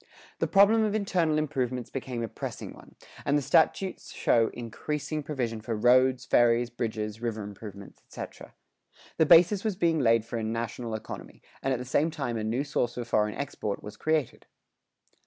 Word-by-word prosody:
The - - +1
problem 205 +3 +5
of 215 -1 0
internal 180 -7 +1
improvements 130 -5 -2
became 125 -3 -4
a - - -2
pressing - - -6
one, - - -16 0.3
and 145 +1 +2
the - - 0
statutes 185 +7 +1
show 115 -1 +2
increasing 150 +6 -4
provision 125 -7 -3
for 110 +1 -3
roads, 125 +2 +4
ferries, 120 0 +3
bridges, 110 -2 -4
river 110 -3 -3
improvements, 100 -1 -10
etc.[109:1] - - -9 0.6
The 160 - +5
basis 175 +4 +6
was 215 -4 -1
being 170 -4 +2
laid 115 -4 +3
for 115 - -4
a - - -3
national 115 +1 -3
economy, 110 - -9 0.2
and 135 - 0
at 130 - +1
the 125 - -6
same 145 +5 +2
time 135 -7 -3
a 110 - -2
new 115 +5 0
source 130 -4 -1
for 120 - -4
foreign 105 -2 +1
export 130 -7 -4
was 105 - -8
created. 155 -5 -1
125 Hz, 175 wpm, -28 LUFS, 115-155 Hz, 0.6 s, basis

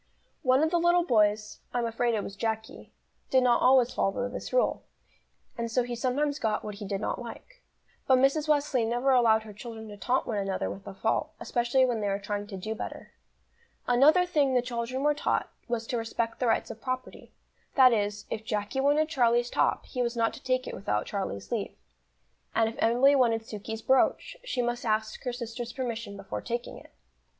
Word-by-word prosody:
One 260 +3 +3
of 315 - +1
the 345 - +3
little 345 +1 +4
boys 210 -6 +2 0.2
I'm 240 -1 +1
afraid 230 +1 0
it 210 - -1
was 200 - -7
Jacky 220 +1 -4 0.4
did 260 -1 +4
not 245 -1 +4
always 255 -1 +5
follow 200 +5 0
this 250 - -6
rule, - - +2 0.8
and 230 0 -2
so 245 +2 +1
he 240 0 -4
sometimes 280 +5 0
got 215 -4 0
what 210 - -5
he 205 0 -7
did 195 0 -2
not 215 - -3
like. - - -10 0.5
But 260 - +6
Mrs. 275 +4 +2
Wesley 290 -5 +2
never 240 +4 +1
allowed 225 -4 +4
her 215 -1 -10
children 220 +1 -8
to 205 - -9
taunt 255 +5 0
one 215 -3 -2
another 195 -1 -2
with 195 - -10
a - - -7
fault, 220 +3 -1
especially 240 +2 +2
when 240 -3 -1
they 205 - -1
were 195 0 0
trying 205 0 -4
to 200 -2 -7
do 215 +4 -4
better. 220 - -7 0.7
Another 290 +9 +5
thing 290 -7 +2
the 250 - +3
children 245 +2 -3
were 295 0 +4
taught, 295 - -1 0.2
was 235 -2 -2
to 240 +1 -2
respect 230 0 -3
the 250 - +1
rights 225 - +1
of 220 - -11
property; 255 -1 -5 0.4
that 255 -3 +7
is, 205 -1 -1
if 220 - -3
Jacky 210 +3 -2
wanted 290 +3 +3
Charlie's 240 -5 +2
top, - - +1
he 250 - -4
was 240 0 -1
not 230 -1 +2
to - - -10
take 255 0 0
it - - -6
without 105 - -2
Charlie's 100 - -4
leave; - - -2 0.8
and 225 0 +3
if 225 - -5
Emily 245 +5 +5
wanted 230 -4 +2
Sukey's 220 +1 -6
brooch, 265 - +2
she 260 - -1
must 240 0 -2
ask 215 -1 -1
her 250 - 0
sister's 240 0 -5
permission 230 -5 -4
before 195 -1 -6
taking 240 0 -4
it. - - -17
235 Hz, 200 wpm, -28 LUFS, 220-260 Hz, 0.8 s, that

